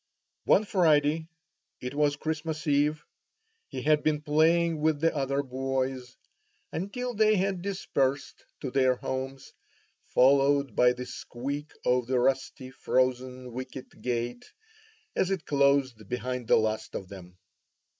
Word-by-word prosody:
One 215 Hz, -, +4 dB
Friday 160 Hz, -4 st, +2 dB, 0.5 s
(it 125 Hz, +1 st, -5 dB
was 145 Hz, 0 st, +2 dB
Christmas 155 Hz, 0 st, -4 dB
Eve) 150 Hz, +1 st, +2 dB, 0.6 s
he -, -, -6 dB
had 150 Hz, 0 st, +3 dB
been 150 Hz, -1 st, 0 dB
playing 160 Hz, +2 st, +3 dB
with 155 Hz, -1 st, +2 dB
the 165 Hz, +1 st, +1 dB
other 140 Hz, 0 st, 0 dB
boys, 130 Hz, -1 st, -3 dB, 0.5 s
until 245 Hz, +8 st, -3 dB
they 215 Hz, 0 st, +4 dB
had 190 Hz, -1 st, 0 dB
dispersed 145 Hz, -8 st, -2 dB, 0.2 s
to 130 Hz, -, -4 dB
their 130 Hz, -1 st, +3 dB
homes, 130 Hz, +1 st, -5 dB, 0.5 s
followed 140 Hz, -1 st, +3 dB
by 125 Hz, 0 st, +5 dB
the 125 Hz, 0 st, -6 dB
squeak 140 Hz, +5 st, -6 dB
of 125 Hz, -1 st, +2 dB
the 130 Hz, -1 st, +1 dB
rusty 130 Hz, 0 st, -1 dB
frozen 130 Hz, -1 st, -1 dB
wicket 130 Hz, +1 st, -8 dB
gate 120 Hz, 0 st, -3 dB, 0.6 s
as 185 Hz, -, +1 dB
it 190 Hz, -5 st, -2 dB
closed 140 Hz, -6 st, +2 dB
behind 125 Hz, -1 st, -3 dB
the -, -, +5 dB
last 110 Hz, 0 st, -1 dB
of 95 Hz, -, -5 dB
them. 90 Hz, -2 st, -12 dB
140 Hz, 130 wpm, -28 LUFS, 125-155 Hz, 0.6 s, by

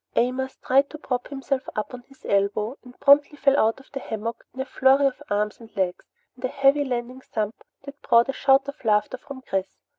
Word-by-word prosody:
Amos 255 Hz, +2 st, 0 dB
tried 275 Hz, +2 st, +4 dB
to 305 Hz, -, -8 dB
prop 250 Hz, -4 st, -3 dB
himself 270 Hz, -1 st, -2 dB
up 215 Hz, +3 st, -3 dB
on 250 Hz, -, -7 dB
his 270 Hz, -1 st, -20 dB
elbow 200 Hz, +4 st, +1 dB
and 250 Hz, -1 st, -15 dB
promptly 285 Hz, +1 st, +5 dB
fell 275 Hz, -1 st, +4 dB
out 225 Hz, +3 st, +2 dB
of 270 Hz, -, -19 dB
the 270 Hz, -, -3 dB
hammock 225 Hz, -1 st, -5 dB
in 260 Hz, -, -13 dB
a 265 Hz, -, -1 dB
flurry 270 Hz, +1 st, +4 dB
of 270 Hz, -2 st, 0 dB
arms 210 Hz, +1 st, -1 dB
and 225 Hz, -1 st, -13 dB
legs 185 Hz, -2 st, -2 dB, 0.2 s
and 250 Hz, -, -17 dB
a -, -, +2 dB
heavy 275 Hz, +2 st, +3 dB
landing 250 Hz, 0 st, -4 dB
thump 215 Hz, -3 st, -4 dB, 0.2 s
that 280 Hz, +1 st, -11 dB
brought 235 Hz, 0 st, +4 dB
a 270 Hz, -, -2 dB
shout 270 Hz, 0 st, +3 dB
of 280 Hz, 0 st, -8 dB
laughter 215 Hz, +3 st, +1 dB
from 265 Hz, -1 st, -10 dB
Chris. 195 Hz, -4 st, -3 dB
260 Hz, 215 wpm, -24 LUFS, 225-275 Hz, 0.2 s, promptly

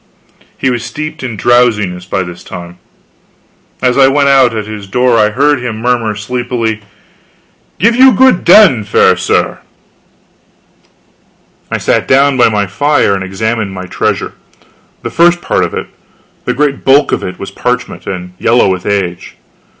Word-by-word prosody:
He 130 Hz, -, 0 dB
was 120 Hz, -2 st, -3 dB
steeped 155 Hz, +6 st, -6 dB
in 120 Hz, -5 st, -5 dB
drowsiness 105 Hz, -6 st, +1 dB
by 95 Hz, 0 st, -1 dB
this 90 Hz, -1 st, -10 dB
time. 85 Hz, 0 st, -10 dB, 1.0 s
As 125 Hz, +1 st, +2 dB
I 135 Hz, -, +6 dB
went 140 Hz, +1 st, +2 dB
out 130 Hz, -4 st, +3 dB
at 105 Hz, -, -4 dB
his 105 Hz, -2 st, -8 dB
door 125 Hz, +3 st, +1 dB
I 105 Hz, -, +3 dB
heard 140 Hz, +4 st, +1 dB
him 115 Hz, -3 st, -4 dB
murmur 115 Hz, -2 st, -1 dB
sleepily: 115 Hz, 0 st, -3 dB, 1.0 s
"Give 230 Hz, +4 st, +2 dB
you 260 Hz, +1 st, +6 dB
good 255 Hz, -3 st, +3 dB
den, 175 Hz, -, +5 dB
fair 100 Hz, -2 st, +3 dB
sir." -, -, -1 dB, 2.1 s
I -, -, -2 dB
sat -, -, 0 dB
down 140 Hz, +1 st, +3 dB
by 125 Hz, -2 st, +4 dB
my 105 Hz, -2 st, 0 dB
fire 145 Hz, +3 st, +1 dB
and 95 Hz, -1 st, -3 dB
examined 105 Hz, +2 st, -3 dB
my 95 Hz, 0 st, -6 dB
treasure. 90 Hz, -, -2 dB, 0.7 s
The -, -, -5 dB
first 175 Hz, +1 st, +3 dB
part -, -, -1 dB
of -, -, -3 dB
it -, -, -4 dB, 0.6 s
the -, -, -1 dB
great 140 Hz, 0 st, -1 dB
bulk 135 Hz, +2 st, +3 dB
of -, -, -1 dB
it 90 Hz, -, -6 dB
was -, -, -8 dB
parchment, -, -, -4 dB
and 90 Hz, -1 st, -6 dB
yellow 120 Hz, -3 st, +2 dB
with 90 Hz, -1 st, -4 dB
age. 90 Hz, -8 st, -3 dB
120 Hz, 160 wpm, -12 LUFS, 100-135 Hz, 2.1 s, I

